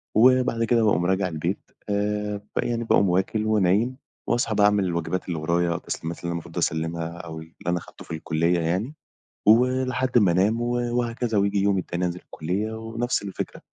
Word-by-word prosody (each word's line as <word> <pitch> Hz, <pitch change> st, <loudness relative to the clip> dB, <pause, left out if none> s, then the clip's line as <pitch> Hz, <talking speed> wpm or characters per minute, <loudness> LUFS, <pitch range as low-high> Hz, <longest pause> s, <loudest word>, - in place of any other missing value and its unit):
وبعد 125 Hz, 0 st, +4 dB
كده 115 Hz, 0 st, +3 dB
باقوم 90 Hz, -5 st, +2 dB
راجع 95 Hz, +1 st, +1 dB
البيت، 85 Hz, +3 st, -4 dB, 0.2 s
آآ 105 Hz, 0 st, -1 dB, 0.2 s
يعني 115 Hz, -1 st, 0 dB
باقوم 100 Hz, -4 st, +3 dB
وَاكل 95 Hz, +4 st, +1 dB
ونايم، 110 Hz, +4 st, +2 dB, 0.3 s
وأصحى 115 Hz, -2 st, +1 dB
بقى 105 Hz, -, +5 dB
أعمل 105 Hz, -1 st, +4 dB
الواجبات 85 Hz, +1 st, -2 dB
اللي 85 Hz, -3 st, -2 dB
ورايا، 85 Hz, +2 st, +1 dB
التسليمات 85 Hz, 0 st, -4 dB
اللي -, -, -10 dB
أنا -, -, -1 dB
المفروض 85 Hz, -1 st, -7 dB
أسلِّمها، 80 Hz, +1 st, -1 dB
أو 80 Hz, -2 st, -7 dB
اللي 80 Hz, +1 st, -12 dB
أنا 90 Hz, 0 st, +2 dB
أخدته -, -, -10 dB
في -, -, -12 dB
الكُلّية 85 Hz, +2 st, +1 dB
يعني، 90 Hz, -, -1 dB, 0.6 s
ولحد 125 Hz, +2 st, +3 dB
ما 95 Hz, -6 st, +4 dB
انام 105 Hz, +6 st, +2 dB
وهكذا، 120 Hz, -1 st, 0 dB
وييجي 100 Hz, 0 st, +2 dB
اليوم 100 Hz, -1 st, +2 dB
التاني 90 Hz, 0 st, -2 dB
أنزل 90 Hz, +1 st, -4 dB
الكُلّية 95 Hz, +7 st, -3 dB
ونفس 115 Hz, +2 st, -2 dB
الفكرة، 100 Hz, -2 st, -5 dB
100 Hz, 170 wpm, -25 LUFS, 85-115 Hz, 0.6 s, بقى